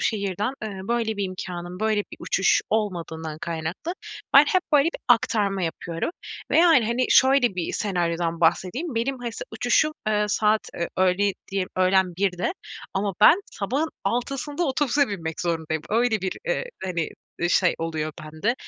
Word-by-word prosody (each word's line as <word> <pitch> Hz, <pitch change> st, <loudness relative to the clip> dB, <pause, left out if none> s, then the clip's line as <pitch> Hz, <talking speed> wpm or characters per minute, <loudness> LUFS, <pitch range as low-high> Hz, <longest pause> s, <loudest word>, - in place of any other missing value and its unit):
şehirden, 205 Hz, +1 st, -1 dB
ııı, 195 Hz, -2 st, -6 dB
böyle 230 Hz, -2 st, 0 dB
bir 200 Hz, -, -1 dB
imkânım, 180 Hz, 0 st, -6 dB
böyle 215 Hz, -1 st, +2 dB
bir -, -, -9 dB
uçuş 195 Hz, -, +2 dB
olmadığından 165 Hz, -7 st, -2 dB
kaynaklı 170 Hz, -, -4 dB, 0.4 s
ben 280 Hz, +2 st, +10 dB
hep 370 Hz, -1 st, +2 dB
böyle 285 Hz, -2 st, +6 dB
bir -, -, -7 dB
aktarma 205 Hz, -5 st, +2 dB
yapıyorum 165 Hz, -, -3 dB, 0.4 s
ve -, -, +4 dB
yani, 325 Hz, -10 st, +6 dB
hani, 240 Hz, +2 st, +1 dB
şöyle, 260 Hz, -5 st, +5 dB
bir 175 Hz, -2 st, -3 dB
senaryodan 170 Hz, -4 st, -1 dB
bahsedeyim: 185 Hz, -, +1 dB
Benim 255 Hz, +3 st, -1 dB
ha 245 Hz, -, -4 dB
s -, -, -6 dB
uçuşum, 245 Hz, +7 st, +2 dB
eee, 210 Hz, -1 st, +2 dB
saat, 215 Hz, +1 st, +1 dB
eee, 170 Hz, -, -2 dB
öğle 185 Hz, +2 st, +2 dB, 0.2 s
diye 195 Hz, -1 st, -1 dB
öğlen 185 Hz, -1 st, +3 dB
13.00'de 190 Hz, -, 0 dB, 0.4 s
ama 195 Hz, 0 st, -1 dB
ben 325 Hz, -, +7 dB
sabahın 265 Hz, +10 st, -1 dB, 0.2 s
06.00'sında 275 Hz, -, -1 dB
otobüse 285 Hz, 0 st, +2 dB
binmek 165 Hz, -6 st, -4 dB
zorundayım. 160 Hz, -2 st, -2 dB
Öyle 225 Hz, 0 st, +2 dB
bir, 190 Hz, 0 st, -2 dB
eee, -, -, 0 dB, 0.2 s
hani, 170 Hz, -4 st, -2 dB, 0.3 s
eee, 175 Hz, -, +1 dB
şey 180 Hz, 0 st, +3 dB
oluyor 155 Hz, -2 st, -3 dB
bende 155 Hz, +10 st, -1 dB
200 Hz, 155 wpm, -24 LUFS, 175-240 Hz, 0.4 s, ben